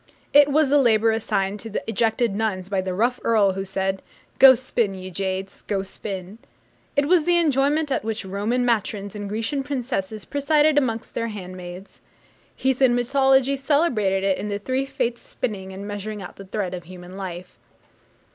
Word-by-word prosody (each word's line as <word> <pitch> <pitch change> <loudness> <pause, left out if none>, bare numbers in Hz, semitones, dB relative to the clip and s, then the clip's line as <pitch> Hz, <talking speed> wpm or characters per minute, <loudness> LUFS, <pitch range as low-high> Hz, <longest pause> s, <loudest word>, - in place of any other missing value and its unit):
It 290 0 +8
was 295 0 +3
the 290 +1 +5
labour 225 -3 +4
assigned 205 -2 -1
to 225 - -7
the 215 - -3
ejected 225 0 +1
nuns 195 -4 -2
by 195 -2 0
the 185 -1 -3
rough 240 +5 +1
earl 210 -4 +4
who 195 +1 -3
said, 190 0 -2 0.4
'Go 265 -1 +10
spin, 235 -5 -1
ye 185 0 -8
jades, 190 +1 -4
go 195 -2 -1
spin.' 195 +1 -7 0.6
It 285 -1 +3
was 335 0 +3
the 350 0 +4
employment 295 -1 +2
at 260 - 0
which 220 -1 -3
Roman 210 +6 -1
matrons 210 -3 -1
and 205 -1 -5
Grecian 225 +7 -1
princesses 245 -7 -3
presided 295 +1 +2
amongst 230 -5 -3
their 230 - -2
handmaids. 185 -2 -9 0.5
Heathen 260 -1 +2
mythology 265 +2 +3
celebrated 265 - +1
it 195 -1 +1
in 210 - -4
the 200 - -1
three 260 +6 -2
Fates 235 -2 -2
spinning 195 -6 -4
and 195 +2 -7
measuring 205 +1 -5
out 180 - -9
the 195 - -10
thread 190 -1 -3
of 175 -2 -6
human 180 +1 -11
life. 180 -2 -7
220 Hz, 175 wpm, -23 LUFS, 195-260 Hz, 0.6 s, Go